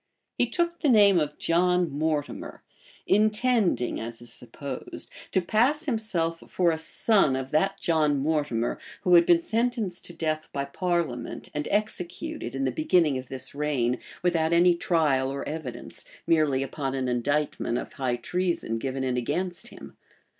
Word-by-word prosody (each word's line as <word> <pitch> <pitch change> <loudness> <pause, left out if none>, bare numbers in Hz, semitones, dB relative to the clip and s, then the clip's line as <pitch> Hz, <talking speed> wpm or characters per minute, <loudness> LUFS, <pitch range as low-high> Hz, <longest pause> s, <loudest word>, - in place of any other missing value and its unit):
He - - +2
took 340 -1 -1
the 300 - +2
name 205 -6 +6
of 150 -1 -2
John 180 0 +2
Mortimer; 150 0 -3 0.4
intending, 215 - +2
as 115 0 -6
is 120 - -8
supposed, 130 +2 -7 0.2
to 190 - +2
pass 255 - +2
himself 210 - -1
for 175 -2 +2
a 160 - -2
son 195 - +3
of 130 0 -4
that 195 +6 +2
Sir - - -18
John 155 -3 +2
Mortimer 140 -5 0 0.2
who 180 - +2
had 170 -1 +7
been 170 -1 +5
sentenced 225 -5 -1
to 175 - -9
death 155 -1 -2
by 140 -1 -2
parliament, 160 -6 -2
and 150 0 -3
executed, 210 - -2
in 135 0 -1
the 130 - +1
beginning 155 0 +2
of 130 - -10
this 130 0 -5
reign, 140 -4 0 0.2
without 170 -2 +2
any 175 +1 +6
trial 155 -6 +1
or 140 0 -4
evidence, 135 -6 -6 0.2
merely 150 -5 +2
upon 135 0 -3
an 130 -1 -1
indictment 125 0 0
of - - -6
high 130 -3 -1
treason 170 -5 -2
given 135 +1 -3
in 130 -1 0
against 175 - -2
him. - - -12
160 Hz, 160 wpm, -27 LUFS, 135-180 Hz, 0.4 s, had